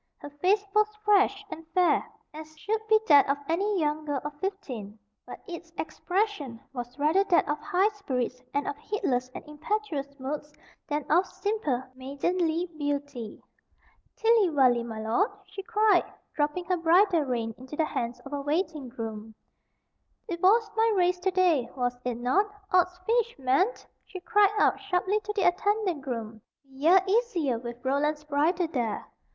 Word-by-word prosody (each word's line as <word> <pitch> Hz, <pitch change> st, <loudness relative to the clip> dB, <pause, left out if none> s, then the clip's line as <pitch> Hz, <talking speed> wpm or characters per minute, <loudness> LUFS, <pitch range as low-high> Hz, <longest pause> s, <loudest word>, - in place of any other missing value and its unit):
Her 290 Hz, -, -10 dB
face 380 Hz, +8 st, +1 dB
was 425 Hz, 0 st, +4 dB, 0.2 s
fresh 405 Hz, 0 st, +3 dB
and 325 Hz, -, -7 dB
fair, 360 Hz, -1 st, +4 dB, 0.3 s
as 310 Hz, 0 st, -10 dB
should 435 Hz, +7 st, -2 dB
be 435 Hz, 0 st, +5 dB
that 285 Hz, -3 st, +6 dB
of 280 Hz, -, +2 dB
any 390 Hz, +4 st, 0 dB
young 305 Hz, 0 st, 0 dB
girl 290 Hz, -2 st, -2 dB
of 295 Hz, -, -4 dB
fifteen, 255 Hz, -, -5 dB, 0.3 s
but -, -, -10 dB
its 340 Hz, -1 st, -8 dB
expression 320 Hz, -, -2 dB
was 245 Hz, 0 st, -6 dB
rather 310 Hz, +7 st, +3 dB
that 360 Hz, -4 st, +3 dB
of 295 Hz, 0 st, -1 dB
high 385 Hz, +4 st, +2 dB
spirits 255 Hz, -, -3 dB
and 285 Hz, +1 st, -1 dB
of -, -, -2 dB
heedless 260 Hz, -11 st, -2 dB
and -, -, -8 dB
impetuous 300 Hz, -3 st, -4 dB
moods 295 Hz, +3 st, -5 dB, 0.4 s
than 295 Hz, -1 st, -2 dB
of 355 Hz, +4 st, +4 dB
simple 390 Hz, -, -2 dB
maidenly 320 Hz, +6 st, -1 dB
beauty. 285 Hz, -6 st, -4 dB, 0.7 s
"Tilly 445 Hz, -4 st, +4 dB
vally, 255 Hz, -6 st, +4 dB
my 225 Hz, -2 st, -6 dB
lord," 230 Hz, -, +1 dB, 0.2 s
she 395 Hz, -, -8 dB
cried, 425 Hz, -2 st, +2 dB, 0.2 s
dropping 295 Hz, +4 st, -1 dB
her 365 Hz, 0 st, 0 dB
bridle 345 Hz, +1 st, +4 dB
rein 235 Hz, -5 st, -2 dB
into 260 Hz, +3 st, -9 dB
the 315 Hz, -, +1 dB
hands 240 Hz, -4 st, -3 dB
of 275 Hz, -, -10 dB
a 285 Hz, -, -2 dB
waiting 300 Hz, -2 st, -2 dB
groom, 225 Hz, -2 st, -7 dB, 0.9 s
"'t 355 Hz, -, -2 dB
was 425 Hz, +5 st, +4 dB
my 450 Hz, 0 st, +3 dB
race 360 Hz, -1 st, +2 dB
to 375 Hz, +1 st, +1 dB
day, 355 Hz, -9 st, +2 dB
was 245 Hz, -1 st, 0 dB
it 250 Hz, -1 st, -2 dB
not? 255 Hz, -, +2 dB, 0.3 s
Odds 360 Hz, 0 st, +3 dB
fish, 470 Hz, +1 st, +1 dB
man!" 270 Hz, +8 st, +3 dB, 0.4 s
she 375 Hz, -, -8 dB
cried 410 Hz, +2 st, +4 dB
out -, -, +3 dB
sharply 395 Hz, +1 st, 0 dB
to 420 Hz, 0 st, -5 dB
the 400 Hz, -, +1 dB
attendant 380 Hz, -2 st, +1 dB
groom; 225 Hz, -4 st, -5 dB, 0.2 s
"be 275 Hz, -, -32 dB
ye 310 Hz, +8 st, +4 dB
easier 380 Hz, -, +1 dB
with 240 Hz, +1 st, -8 dB
Roland's 295 Hz, +3 st, 0 dB
bridle 310 Hz, +4 st, +1 dB
there. 240 Hz, -8 st, -2 dB
315 Hz, 165 wpm, -27 LUFS, 270-390 Hz, 0.9 s, that